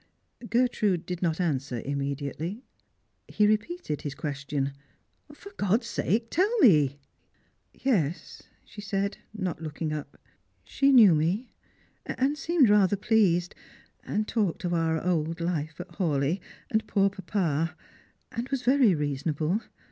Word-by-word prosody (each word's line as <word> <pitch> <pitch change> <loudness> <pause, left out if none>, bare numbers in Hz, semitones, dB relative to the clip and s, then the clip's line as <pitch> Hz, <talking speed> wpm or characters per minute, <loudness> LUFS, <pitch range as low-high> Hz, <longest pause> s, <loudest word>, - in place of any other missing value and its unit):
Gertrude 220 -7 +1
did 180 -1 -5
not 165 -2 0
answer 135 -7 -1
immediately. 140 - -3 0.6
He 210 - +2
repeated 215 - -1
his 145 -2 -5
ques 145 -1 -4
tion. 140 -1 -1 0.3
" - - -23
For 400 +6 -12
God's 215 +5 +1
sake 230 0 -1
tell 375 +6 +3
me 150 - +5 0.3
!" - - -40
" - - -45
Yes," 175 - -1 0.2
she 210 - -10
said, 200 0 -2
not 185 -6 -4
looking 155 0 -4
up, 150 -1 -6 0.3
" - - -43
she 275 0 +4
knew 225 -9 +8
me, 175 +11 0 0.5
and 275 +3 0
seemed 305 -2 +3
rather 205 -1 +4
pleased, 190 -5 +2 0.5
and 215 +1 -2
talked 205 -8 -1
of 175 -1 -1
our 165 -1 0
old 165 -1 0
life 160 -2 -2
at 180 - -7
Hawleigh, 155 0 +1 0.3
and 220 0 0
poor 195 -1 +2
papa, 170 -5 -1 0.6
and 235 +3 -4
was 275 -2 -2
very 255 -7 +4
reasonable. 150 +6 -1
180 Hz, 140 wpm, -27 LUFS, 155-220 Hz, 0.6 s, knew